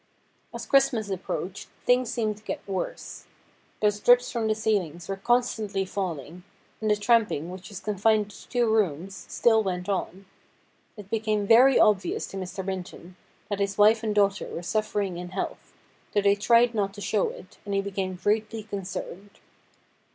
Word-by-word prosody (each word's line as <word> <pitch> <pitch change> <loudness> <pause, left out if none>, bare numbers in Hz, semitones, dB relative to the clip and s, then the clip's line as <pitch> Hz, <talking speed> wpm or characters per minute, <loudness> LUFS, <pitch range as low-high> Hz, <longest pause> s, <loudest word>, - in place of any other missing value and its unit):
As - - -6
Christmas 245 -7 +2
approached 185 0 -4 0.2
things 245 -1 +3
seemed 215 -3 -1
to 210 - -19
get - - -6
worse. 190 -2 -5 0.5
Those 210 -1 +2
drips 245 +3 +4
from 230 -2 -1
the 215 - +1
ceilings 190 -7 -1
were 195 - -2
constantly 215 -3 0
falling, 180 -3 -5 0.4
and 215 - 0
the 210 - +4
tramping, 205 -7 +1
which 185 -1 -9
was 195 - -7
confined 210 +1 +1
to - - -14
two 245 -2 +1
rooms, 195 -4 -1
still 225 -2 +3
went 180 -2 -3
on. 195 0 -3 0.7
It 205 -1 -11
became 215 -2 0
very 245 +5 +6
obvious 215 - +2
to 195 - -6
Mr. 190 0 -5
Minton 185 -1 -6 0.3
that 205 -1 -3
his 200 0 -1
wife 215 +2 +5
and 215 -2 -2
daughter 200 -1 +2
were 170 - -6
suffering 205 -2 -1
in 180 0 -6
health, 190 +1 -5 0.4
though 205 - +3
they 200 0 +4
tried 235 +3 +4
not 200 -2 -1
to 205 - -9
show 205 +1 +1
it, 185 - -12
and 200 0 -3
he 195 - +2
became 195 -2 -3
greatly 215 +3 -1
concerned. 200 -1 -7
205 Hz, 165 wpm, -26 LUFS, 190-220 Hz, 0.7 s, very